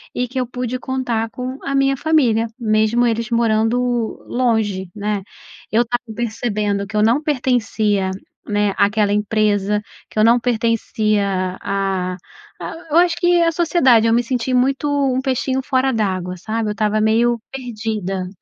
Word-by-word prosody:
e 250 0 -1
que 260 +2 -4
eu 250 - -1
pude 250 0 -4
contar 245 -4 -2
com 255 +3 -6
a 275 - -2
minha 275 0 +3
família, 250 -8 +2
mesmo 220 +2 +2
eles 230 0 -1
morando 225 0 +2 0.5
longe, 220 -7 0
né. 205 -1 -2 0.5
Eu 230 +2 +4
estava 240 +1 -3
percebendo 210 -3 -2
que 215 +1 -4
eu 210 - +3
não 240 +7 +3
pertencia, 220 -8 0 0.4
né, 205 -1 +1
aquela 205 0 +2
empresa, 210 -1 +1 0.3
que - - -14
eu - - +5
não 235 +2 +5
pertencia, 215 -5 0
ah 190 -2 -2 0.4
ah, - - -5 0.2
eu 325 - +3
acho 345 -1 +4
que 350 0 +3
a 330 - +3
sociedade 270 -10 +4
eu 225 - +3
me 240 - +4
senti 250 +1 -2
muito, 265 +3 +1
um 275 -3 +1
peixinho 265 0 -1
fora 265 -1 +1
d'água 185 -4 -1
sabe. 220 +4 -3
Eu - - -1
estava 215 +1 0
meio 230 +2 +2
perdida. 215 -7 -4
225 Hz, 155 wpm, -19 LUFS, 210-255 Hz, 0.5 s, eu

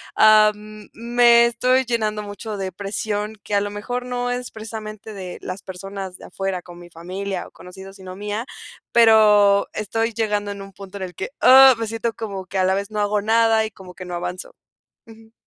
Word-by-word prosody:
am, 215 -1 +3
me 235 0 +4
estoy 255 +2 +1
llenando 215 -3 -1
mucho 205 +1 -7
de 190 -1 -4
presión, 210 +2 -4
que 205 - -3
a 200 - +4
lo 205 0 -3
mejor 245 +4 -4
no 245 0 -3
es 245 0 -4
precisamente 220 -1 -8
de 185 -3 -8
las 185 +2 -7
personas 190 0 -7
de - - -12
afuera, 195 -2 -4
como 175 0 -13
mi 175 - -14
familia 185 +3 -5
o - - -19
conocidos, 190 +2 -12
sino 185 -1 -10
mía, 210 +4 -4 0.5
pero, 210 -3 +5
estoy 225 +2 -2
llegando 210 -2 -1
en 200 - -7
un 195 -1 -11
punto 195 0 -10
en 190 - -5
el 180 -2 -11
que, - - -5
¡ah!, 265 0 +9
me 225 - -2
siento 225 +1 -3
como 200 -3 -6
que 190 0 -3
a 185 - +3
la 190 - +2
vez 200 +2 -4
no 210 - -3
hago 205 0 +1
nada 225 0 +3
y 215 - -6
como 185 -2 -13
que 185 - -9
no 180 - -7
avanzo, 180 +1 -6 0.5
ujú. 225 0 -17
210 Hz, 200 wpm, -21 LUFS, 195-225 Hz, 0.5 s, ah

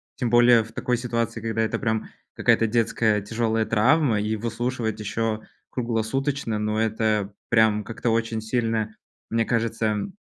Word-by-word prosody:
Тем 125 -3 -1
более 120 -1 +6
в 110 - -13
такой 125 +2 -1
ситуации, 115 -1 -2
когда 110 0 -1
это 110 - -1
прям 110 -1 -1 0.3
какая-то 115 - +3
детская 110 -1 +1
тяжёлая 110 +1 0
травма, 115 +1 +3
и 105 +1 -1
выслушивать 115 0 -2
ещё 110 +1 -2 0.3
круглосуточно, 120 +1 -1
ну, 105 0 -1
это 110 -2 0 0.2
прям 110 -2 +3
как-то 115 +2 -2
очень 115 0 0
сильно, 110 -1 -1 0.3
мне 115 0 +1
кажется, 115 -1 0
м, 110 - -2
115 Hz, 145 wpm, -24 LUFS, 110-115 Hz, 0.3 s, более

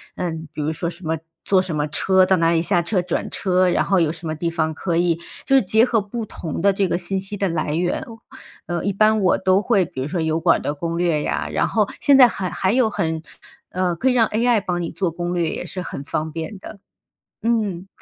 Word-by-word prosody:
嗯， 160 -3 -4
比 150 - -4
如 155 +2 -1
说 170 +2 -3
什 175 +2 -12
么， 160 +1 0 0.3
坐 190 -2 +3
什 185 -4 -4
么 150 0 0
车 190 +4 +3
到 190 0 +3
哪 165 0 +3
里 165 -1 +2
下 175 0 +3
车 180 +2 0
转 175 -1 -3
车， 185 -1 +2
然 - - +2
后 195 -2 +2
有 160 -2 +2
什 165 0 -7
么 155 - -2
地 170 +2 -2
方 160 -2 -1
可 170 +1 -2
以， 170 -1 +2 0.3
就 270 - +3
是 265 - +6
结 220 +4 +4
合 230 -4 +1
不 220 +3 -5
同 165 -5 -6
的 200 0 +4
这 195 -1 +1
个 175 - 0
信 190 +2 -1
息 195 +2 -5
的 195 - 0
来 155 -2 -2
源， 175 +2 -1 0.6
呃， 175 -1 -3
一 200 - 0
般 215 +1 +3
我 185 - +3
都 190 +1 +2
会 200 -6 +2
比 130 - -7
如 135 - -2
说 175 - -2
油 160 0 0
管 165 0 +3
的 145 - -2
攻 170 +3 -4
略 170 -4 +1
呀， - - -2
然 - - +1
后 - - +1
现 280 -2 +5
在 255 -2 +9
还 190 -6 -3
还 190 +1 0
有 250 -3 +3
很， 160 -5 -2 0.5
呃， 180 -1 -1
可 260 +9 +1
以 - - +2
让 230 -3 +4
AI 230 +1 +2
帮 175 -2 -2
你 165 - -4
做 170 +1 -1
攻 175 +1 -3
略 170 -2 0
也 - - -5
是 185 +1 -5
很 140 - -6
方 155 +2 -3
便 165 +5 -6
的， 200 - -11 0.6
嗯。 210 -6 -1
180 Hz, 270 characters per minute, -21 LUFS, 165-200 Hz, 0.6 s, 在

